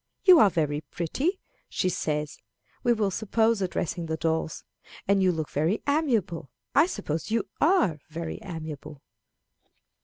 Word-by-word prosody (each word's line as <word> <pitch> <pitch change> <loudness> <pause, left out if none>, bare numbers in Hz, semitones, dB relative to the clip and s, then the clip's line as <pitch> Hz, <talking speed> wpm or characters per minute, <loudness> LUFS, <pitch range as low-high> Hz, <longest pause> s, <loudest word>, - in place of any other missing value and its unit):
"You 365 -4 +9
are 210 - +7
very 150 -4 0
pretty" 270 - -2 0.3
she - - 0
says, 150 -4 -2 0.4
we 240 - +2
will 215 -4 +1
suppose, 220 +2 +1
addressing 175 -2 -2
the 160 0 -2
dolls 160 0 -1 0.4
"and 200 0 +4
you 185 -1 +4
look 160 -3 -4
very 160 +9 0
amiable. 235 - 0 0.2
I 305 +5 +5
suppose 160 - -3
you 225 0 0
are 260 - +3
very 165 0 -5
amiable." 155 -4 -7
175 Hz, 140 wpm, -27 LUFS, 160-225 Hz, 0.4 s, You